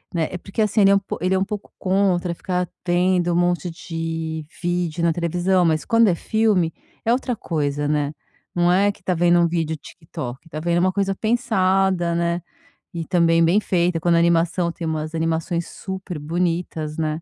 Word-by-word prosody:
né 160 -2 0
Eh, 180 - -4
porque, 195 +4 -4
assim, 215 +1 +1
ele 195 -1 +6
é - - +6
um - - +4
po 195 - -6
ele 185 +2 +1
é - - +3
um - - +2
pouco 205 0 -6
contra 185 -2 +1
ficar 180 +1 -2 0.2
vendo 175 0 +2
um - - 0
monte 175 0 +1
de 165 -1 -4 0.2
vídeo 175 -1 -1
na 170 - +4
televisão, 175 +2 +1
mas 155 -1 +1
quando 230 -2 +4
é 175 - +3
filme 205 -5 +1 0.3
é 230 - +2
outra 250 -1 0
coisa, 145 -5 -2
né, 150 0 0 0.4
não 175 0 +3
é 200 +2 +3
que - - -22
está 185 - 0
vendo 175 +1 +4
um 170 - +4
vídeo 165 -2 -1
TikTok 145 -4 -8
está 155 -1 -6
vendo 170 +1 +1
uma 185 +1 +2
coisa 195 -1 0
pensada, 190 -6 +1
né. 170 0 0 0.5
E 165 -1 -4
também 165 -1 +3
bem 195 +6 +3
feita. 175 -3 +1
Quando 170 0 +3
animação 170 +1 +2
tem 170 0 -6
umas 155 0 -3
animações 165 +1 -1
super 190 -4 -6
bonitas, 165 -1 -2
né. 155 0 -2
175 Hz, 190 wpm, -22 LUFS, 165-185 Hz, 0.5 s, ele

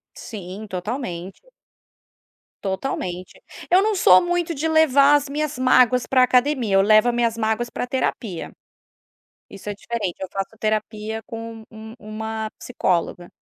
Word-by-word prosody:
Sim, 200 -1 -8
totalmente. 190 -2 -5 1.2
Totalmente. 185 -3 -4 0.3
Eu 365 - +6
não 430 0 +1
sou 185 - +6
muito 350 -1 -1
de 300 +2 -2
levar 290 -3 +5
as 290 -1 +2
minhas 295 -2 -3
mágoas 255 -1 +4
para 255 -1 +3
a - - +8
academia. 250 -4 +2
Eu 195 - +6
levo 215 +3 +5
as 240 - +1
minhas 235 -1 +1
mágoas 220 +2 -1
para - - -3
a - - -6
terapia. 235 -7 -3 1.0
Isso 200 +1 -10
é 205 - -3
diferente. 205 -4 -4
Eu 190 - -4
faço 195 +3 -4
terapia 215 0 -2
com 225 0 -8
um 220 0 -10
uma 220 +1 -5
psicóloga. 175 -6 -2
225 Hz, 150 wpm, -22 LUFS, 205-255 Hz, 1.2 s, a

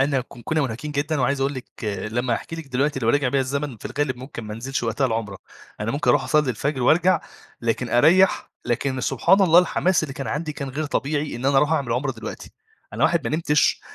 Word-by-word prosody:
أنا 135 -1 +2
ك - - -10 0.2
كُنا 155 -1 0
مُنهكين 135 +4 -4
جدًا، 145 0 -1
وعايز 135 +2 +1
أقول 135 +1 0
لِك 130 - -6 0.5
لمّا 120 0 0
هاحكِي 165 - -6
لِك 160 -4 -8
دلوقتي 135 +2 0
لو 115 - 0
رجع 140 +1 +3
بيَّ 140 - +1
الزمن 140 -1 -2
في - - -17
الغالب 145 -3 -2
مُمكن 125 -2 -8
ما 105 0 -6
أنزِلش 130 +4 -3
وقتها 120 +4 0
العمرة. 110 -4 -3 0.4
أنا 105 +2 -1
مُمكن 145 - +1
أروح - - +3
أصلي 150 -3 +2
الفجر 130 +3 -2
وأرجع، 170 +5 +4 0.4
لكن 115 +1 -1
أريح، 170 +10 +4
لكن 130 +2 -1
سبحان 135 - +3
الله 175 -3 +6
الحماس 180 0 +2
اللي 140 -4 -4
كان 135 - -5
عندي 150 +1 -3
كان 140 -2 -5
غير 150 +4 -3
طبيعي 150 0 -2
إن 125 +3 -3
أنا 140 0 +3
أروح 150 +3 +4
أعمل 135 -7 0
عُمرة 135 +2 -1
دلوقتي، 110 -2 -8 0.4
أنا - - 0
واحد 165 -3 +2
ما 155 - -1
نمتش 150 -2 +2
140 Hz, 220 wpm, -23 LUFS, 125-150 Hz, 0.5 s, الله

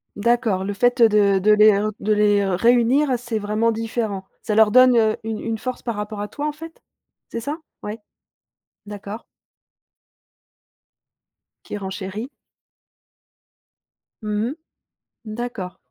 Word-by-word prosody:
D'accord, 225 -3 +1
le 205 +1 -3
fait, 245 +5 +1
heu, 230 - +7
de 200 -2 +3
de 210 +3 +3
les 215 0 +7
r 210 +1 -1
de 215 +1 +1
les 205 -1 +3
réunir, 240 +9 +3
c'est 240 -2 -4
vraiment 215 +2 0
différent. 220 -3 -3 0.2
Ça 210 - -2
leur 220 -1 +5
donne, 255 +1 +6
heu, 220 -1 +2
une 220 -1 -4
une 225 -1 -3
force 255 +2 -5
par 235 -2 -3
rapport 210 0 -5
à 205 - -3
toi 290 +7 -4
en - - -1
fait? 325 +2 -11 0.5
C'est 230 - -4
ça? 285 +7 -4 0.3
Ouais. 210 +2 -5 0.9
D'accord. 205 +2 -8 2.4
Qui - - -6
renchérit. 195 +4 -6 1.9
Mmh 210 +1 -1
mh. - - -8 0.7
D'accord. 215 -4 -6
215 Hz, 135 wpm, -22 LUFS, 205-240 Hz, 2.4 s, heu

